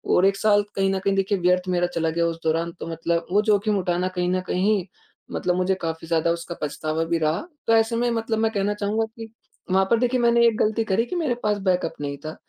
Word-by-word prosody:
और 180 - +4
1 195 0 +3
साल 205 0 +3
कहीं 195 0 +2
न 190 - -1
कहीं 195 +1 0
देखिए 195 +1 +1
व्यर्थ 180 +1 +2
मेरा 175 -1 +1
चला 165 -2 -1
गया 170 +1 0
उस 165 0 -4
दौरान 165 +1 0
तो - - -6
मतलब 165 +1 -1
वो 205 - +4
जोख़िम 205 0 +2
उठाना 180 0 0
कहीं 180 0 +1
न 185 0 0
कहीं 195 0 +1 0.5
मतलब 180 -1 0
मुझे 185 +1 +1
काफ़ी 165 0 -4
ज़्यादा 165 0 +1
उसका 170 0 -4
पछतावा 155 +2 -2
भी 170 0 0
रहा। 155 +1 0 0.3
तो 225 - +4
ऐसे 225 +1 +2
में 240 +1 +1
मतलब 225 -1 -1
मैं 220 0 +1
कहना 205 0 0
चाहूँगा 210 +2 -1
कि 225 -1 -8 0.4
वहाँ 190 +1 +4
पर 230 - +4
देखिए 250 +1 +1
मैंने 235 0 +4
एक 225 -2 +1
ग़लती 220 +1 +1
करी 220 +2 +1
कि 360 - -5
मेरे 305 -8 0
पास 210 -1 +1
बैकअप 180 -1 +1
नहीं 140 -1 -4
था। 155 - -5
190 Hz, 240 wpm, -23 LUFS, 170-220 Hz, 0.5 s, और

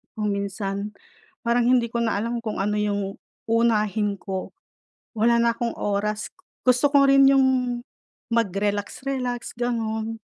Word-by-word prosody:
kung 210 -2 -1
minsan 200 0 -3 0.5
parang 235 0 +2
hindi 240 -2 +3
ko 235 - -1
na 230 -1 +1
alam 235 +2 -2
kung 220 -2 -4
ano 210 +1 0
yung 200 -1 -2 0.3
uunahin 215 -3 +2
ko, 190 -1 -5 0.6
wala 235 +2 +3
na 235 0 +3
akong 235 0 -2
oras. 205 +1 -1 0.4
Gusto 255 +3 +4
ko 280 -1 +5
rin 275 0 +6
yung 270 -1 +5 0.9
mag-relax-relax 230 +4 -2
gano'n, 225 -2 -2
225 Hz, 130 wpm, -24 LUFS, 205-240 Hz, 0.9 s, rin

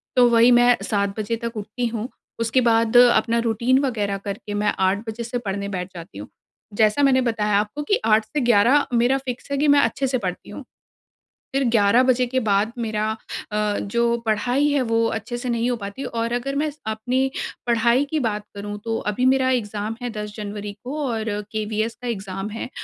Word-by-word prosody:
तो 250 -1 +6
वही 235 +1 +5
मैं 245 0 +6
7 200 -1 -1
बजे 215 +2 -1
तक 230 -1 -4
उठती 215 +4 -4
हूँ, 230 +1 -4 0.3
उसके 230 +3 +2
बाद 230 0 +3
अपना 235 -1 +5
रुटीन 235 +3 +2
वग़ैरह 205 -6 -1
करके 200 +1 -6
मैं 205 0 +1
8 190 +1 +2
बजे 220 +2 -4
से 240 +1 -3
पढ़ने 200 -3 -3
बैठ 185 -1 -5
जाती 170 - -10
हूँ। 105 - -7 0.5
जैसा 220 +6 +3
मैंने 265 -2 +4
बताया 215 -4 +1
आपको 210 +8 -3
कि 405 +8 +1
8 215 0 +4
से 300 +7 -3
11 240 +4 +4
मेरा 245 +3 +3
फ़िक्स 260 0 -7
है 280 - 0
कि 295 +2 +2
मैं 285 0 +6
अच्छे 275 -1 +1
से 255 0 0
पढ़ती 185 -6 -5
हूँ। - - -8 0.9
फिर 270 0 +1
11 225 +1 +4
बजे 255 -1 +3
के 260 +2 -1
बाद 210 0 +1
मेरा 215 -2 -1 0.5
अ, 210 -1 0
जो 235 +3 +1
पढ़ाई 245 +6 +1
है, 285 -2 +2
वो 230 -1 +1
अच्छे 225 +2 -3
से 250 - -5
नहीं 235 0 0
हो 245 - 0
पाती 205 +5 -6
और 230 0 -2
अगर 245 +3 -2
मैं 300 +2 0 0.2
अपनी 245 +5 0 0.4
पढ़ाई 235 +3 +3
की 315 - 0
बात 210 -4 -2
करूँ, 205 +1 -6
तो 225 -1 -1
अभी 250 +5 -1
मेरा 260 0 +3
एग्ज़ाम 215 -3 -2
है 245 - -2
10 210 -1 -6
जनवरी 205 -1 -5
को 275 +5 -5
और 225 -3 -2 0.3
केवीएस 215 +1 -2
का 245 - -4
एग्ज़ाम 195 -3 -4
है 225 +3 -5
230 Hz, 200 wpm, -22 LUFS, 210-250 Hz, 0.9 s, तो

